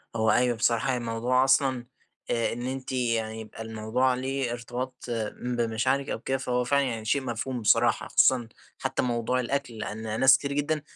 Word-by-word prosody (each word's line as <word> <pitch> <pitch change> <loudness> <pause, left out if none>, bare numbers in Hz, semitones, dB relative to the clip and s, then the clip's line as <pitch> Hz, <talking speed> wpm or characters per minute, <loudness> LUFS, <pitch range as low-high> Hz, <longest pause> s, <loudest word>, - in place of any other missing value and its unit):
هو 110 -1 +3
أيوه، 125 -1 +3
بصراحة 115 +3 +1
يعني 125 - 0
الموضوع 120 +3 +1
أصلًا 130 -2 +2 0.5
آآ 115 -1 +1
إن 120 - -6
أنتِ 130 0 -5
يعني 115 -3 -1
يبقى 110 0 -9
الموضوع 110 +4 0
ليه 130 0 -2
ارتباط 120 +2 -4 0.5
بمشاعرِك 125 +3 0
أو - - -2
كده 135 +4 -1
فهو 125 -1 -1
فعلًا 140 +3 +2
يعني، 115 -3 -4
شيء 140 +5 +1
مفهوم 120 +1 -3
بصراحة، 115 +2 +3
خصوصًا 125 -3 +4 0.3
حتى - - -1
موضوع 120 +1 0
الأكل، 135 0 -2
لأن 110 0 -4
ناس 130 0 +7
كتير 140 0 -4
جدًا 145 +1 0
125 Hz, 170 wpm, -27 LUFS, 115-130 Hz, 0.5 s, ناس